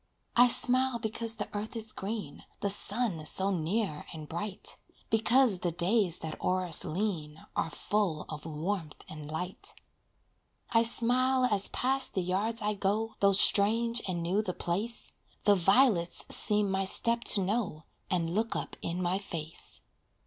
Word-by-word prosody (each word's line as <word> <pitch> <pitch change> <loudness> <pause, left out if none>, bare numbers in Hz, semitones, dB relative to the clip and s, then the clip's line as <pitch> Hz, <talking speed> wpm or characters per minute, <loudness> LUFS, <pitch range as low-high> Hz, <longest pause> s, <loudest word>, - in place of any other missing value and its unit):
I 245 +1 +7
smile 255 +1 +2
because 225 0 0
the 205 -2 -4
earth 210 +3 -4
is 220 -1 -1
green, 210 +2 -6 0.2
The 200 - +4
sun 205 -4 -1
so 190 +4 +3
near 180 -1 -2
and 155 -2 -9
bright, 190 +5 -4 0.4
Because 225 -1 +3
the 175 - -1
days 180 +2 +1
that 160 - -7
o'er 185 0 0
us 165 -4 +5
lean 160 -5 -4
Are - - -1
full 180 -2 -2
of 155 0 -8
warmth 160 +1 -4
and 150 -1 -9
light. 180 +4 -5 1.0
I 225 - +4
smile 250 +3 +2
as 205 -5 +3
past 265 +1 +1
the 190 - 0
yards 205 +6 -1
I 210 0 0
go, 210 +3 -2
Though 200 0 +3
strange 230 +4 +4
and 175 -2 -3
new 185 +5 0
the 185 -4 -5
place, 205 +7 -3 0.3
The 205 - +5
violets 195 -1 +3
seem 210 -2 +3
my 190 0 -1
step 235 +4 0
to 200 - 0
know, 190 -6 -2 0.3
And 170 -2 -1
look 225 +3 -1
up - - -5
in 175 +2 -3
my 180 +2 0
face. 165 -5 -7
200 Hz, 155 wpm, -29 LUFS, 175-225 Hz, 1.0 s, I